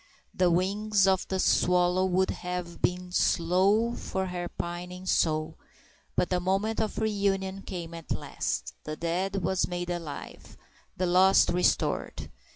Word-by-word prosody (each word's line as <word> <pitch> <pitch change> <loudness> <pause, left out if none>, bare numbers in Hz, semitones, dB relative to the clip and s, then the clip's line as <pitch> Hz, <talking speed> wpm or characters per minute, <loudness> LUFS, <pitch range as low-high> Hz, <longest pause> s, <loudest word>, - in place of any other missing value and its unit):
The 180 -1 +3
wings 200 +3 +2
of 190 -1 +2
the 190 - -2
swallow 180 0 +3
would 185 +1 +1
have 180 -1 -5
been 180 0 -1
slow 190 +7 +2
for 190 -4 -3
her 175 -1 -4
pining 180 +1 -6
soul; 155 -3 0 0.6
but 180 - +1
the 180 - +2
moment 195 +5 0
of 215 - -3
reunion 195 -3 0
came 175 -4 -6
at 165 -1 -10
last—the - - -4
dead 185 +4 -2
was 190 +2 +1
made 175 0 -3
alive, 165 -4 -7 0.4
the 185 - 0
lost 185 +2 +5
restored. 180 +1 0
180 Hz, 135 wpm, -28 LUFS, 175-190 Hz, 0.6 s, lost